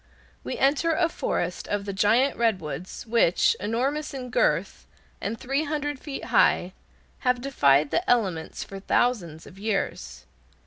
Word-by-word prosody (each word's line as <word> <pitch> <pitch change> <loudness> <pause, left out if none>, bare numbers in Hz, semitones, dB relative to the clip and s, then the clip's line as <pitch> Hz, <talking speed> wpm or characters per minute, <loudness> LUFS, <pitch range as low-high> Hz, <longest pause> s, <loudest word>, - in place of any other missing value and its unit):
We - - -4
enter 300 +4 +2
a 340 0 +3
forest 335 - -3
of 205 -1 -2
the 200 - -4
giant 225 +8 +3
redwoods, 185 - -2
which, 225 -6 +3
enormous 270 +9 -2
in 250 -2 -6
girth, - - 0 0.3
and 215 +2 -3
three 275 +4 -1
hundred 290 -2 -3
feet 280 -1 -6
high, 180 +1 +3 0.5
have 250 -1 +1
defied 145 - +3
the 355 - 0
elements 190 -10 0
for 195 - -9
thousands 190 -7 0
of 190 - -14
years. 200 - -3
230 Hz, 140 wpm, -26 LUFS, 190-275 Hz, 0.5 s, a